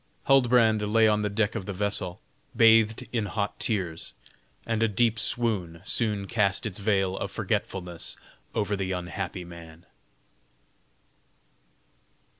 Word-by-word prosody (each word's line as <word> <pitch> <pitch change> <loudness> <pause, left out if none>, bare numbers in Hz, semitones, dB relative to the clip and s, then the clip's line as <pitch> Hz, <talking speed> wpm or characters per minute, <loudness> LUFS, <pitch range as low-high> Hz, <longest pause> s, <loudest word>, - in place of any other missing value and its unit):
Huldbrand 120 -5 +4
lay 110 +2 +4
on 105 0 +2
the 105 - 0
deck 105 +1 0
of 105 -5 -5
the 100 - -3
vessel, 95 -2 -2 0.3
bathed 115 +1 +5
in 110 -3 0
hot 100 +1 -3
tears, 90 -7 -2 0.5
and 115 -1 -1
a 115 - +4
deep 110 +1 +2
swoon 105 -8 -1
soon 105 -2 -1
cast 100 +1 +1
its 105 -2 -4
veil 95 -2 +1
of - - -3
forgetfulness 90 -3 -3 0.4
over 105 0 0
the 95 -1 -2
unhappy 90 0 -4
man. 85 -1 -12
105 Hz, 125 wpm, -27 LUFS, 95-110 Hz, 0.5 s, bathed